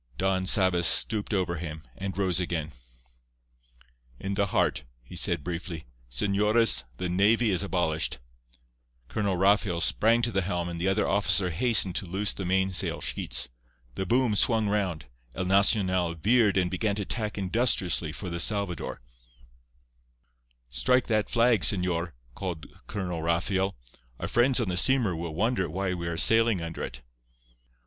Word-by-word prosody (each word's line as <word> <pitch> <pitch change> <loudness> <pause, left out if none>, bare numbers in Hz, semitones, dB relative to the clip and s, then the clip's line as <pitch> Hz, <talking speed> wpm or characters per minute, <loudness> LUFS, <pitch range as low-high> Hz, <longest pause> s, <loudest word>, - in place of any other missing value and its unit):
Don 95 -1 0
Sabas 95 -4 +5
stooped 105 +6 +3
over 90 -4 -1
him, 80 -1 -7
and 95 -1 -6
rose 95 -3 +1
again. 85 -3 -3 1.5
"In 100 0 -4
the 100 0 0
heart," 70 -7 0 0.2
he - - -12
said 85 -4 +1
briefly. 85 -2 -6 0.3
"Señores, 105 - +2
the 90 - -3
navy 105 +5 +2
is 90 - 0
abolished." 85 -8 -1 0.9
Colonel 100 -3 -1
Rafael 95 -2 +2
sprang 115 +7 +2
to 120 - 0
the 95 - 0
helm, 85 -2 -3
and 85 -1 -6
the 95 - 0
other 95 +2 +1
officer 95 -2 +2
hastened 100 0 +2
to 95 - -3
loose 95 +4 -1
the 95 - -6
mainsail 95 0 0
sheets. - - -1 0.4
The 95 +6 -4
boom 120 0 +2
swung 110 0 +2
round; 95 -9 -2 0.3
El 95 - -3
Nacional 95 -3 +2
veered 105 +3 +2
and 90 -1 +1
began 100 +2 -1
to 100 -1 -4
tack 105 -1 -3
industriously 95 -5 +1
for 90 +2 -7
the 85 - -4
Salvador. 90 -4 -2 1.7
"Strike 95 - +1
that 110 -2 0
flag, 115 -3 +3
señor," 85 0 +1 0.2
called 90 -2 -6 0.2
Colonel 90 -5 -4
Rafael. 95 - -1 0.4
"Our - - -4
friends 125 +2 +2
on 115 - -1
the 90 - -2
steamer 120 -4 +2
will 80 -1 -6
wonder 105 -2 0
why 95 +3 -2
we 85 -2 -5
are 85 -1 -3
sailing 115 +1 +4
under 85 -1 -6
it." - - -7
95 Hz, 150 wpm, -27 LUFS, 85-105 Hz, 1.7 s, Sabas